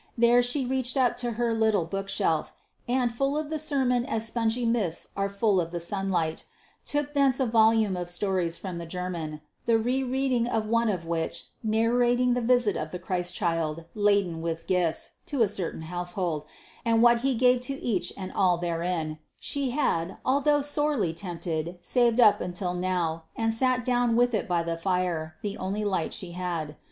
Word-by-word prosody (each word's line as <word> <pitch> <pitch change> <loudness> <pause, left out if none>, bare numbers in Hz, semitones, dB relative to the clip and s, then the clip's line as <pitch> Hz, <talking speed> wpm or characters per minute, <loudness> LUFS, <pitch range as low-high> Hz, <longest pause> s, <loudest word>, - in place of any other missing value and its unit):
There 235 +1 +5
she 245 +2 0
reached 260 0 -1
up 255 -2 +3
to 240 -1 -2
her 235 +1 0
little 220 -5 +2
bookshelf, 195 -2 -1 0.3
and, 245 -1 +1
full 275 +5 0
of 305 0 -3
the 315 - -1
sermon 265 -5 +1
as 225 -4 -1
spongy 230 +1 0
mists 220 -8 0
are 195 0 0
full 200 -1 +2
of 165 - -4
the 175 0 -4
sunlight, 175 -3 -1 0.4
took 290 0 -1
thence 275 -2 +3
a 265 - +2
volume 220 -3 +4
of 175 -1 -3
stories 175 -2 0
from 180 -3 -6
the 170 - -7
German, 165 -3 -4 0.3
the 230 -1 +5
re 250 +4 0
reading 260 -2 0
of 225 -3 0
one 230 +1 +2
of 180 -5 -2
which, 165 -1 -3
narrating 240 +3 +2
the 245 - 0
visit 240 -4 +3
of 155 - -3
the 180 - -5
Christ 180 0 -3
child, 165 -3 -1
laden 200 -5 +2
with 165 0 -3
gifts, 180 -3 0 0.2
to 275 -6 +2
a - - +3
certain 185 -5 -4
household, 175 -2 -2 0.4
and 230 -1 +3
what 240 -1 +6
he 265 +1 +1
gave 250 +1 +4
to 270 +2 -3
each 210 -7 -1
and 190 -1 -6
all 180 -2 +3
therein, 170 -2 -2 0.2
she 280 -2 -2
had, 190 - 0
although 285 +2 +3
sorely 290 - +1
tempted, 170 -1 -4
saved 235 +6 +2
up 215 -4 +6
until 180 0 -3
now, 175 -3 -1
and 225 0 0
sat 255 +1 +1
down 245 -2 +2
with 245 +1 +3
it 215 - 0
by 175 -2 +1
the 165 0 -2
fire, 175 -3 -1
the 205 -1 -2
only 200 +3 -2
light 185 -5 0
she 180 -2 -6
had. 170 -4 -3
205 Hz, 185 wpm, -27 LUFS, 175-245 Hz, 0.4 s, what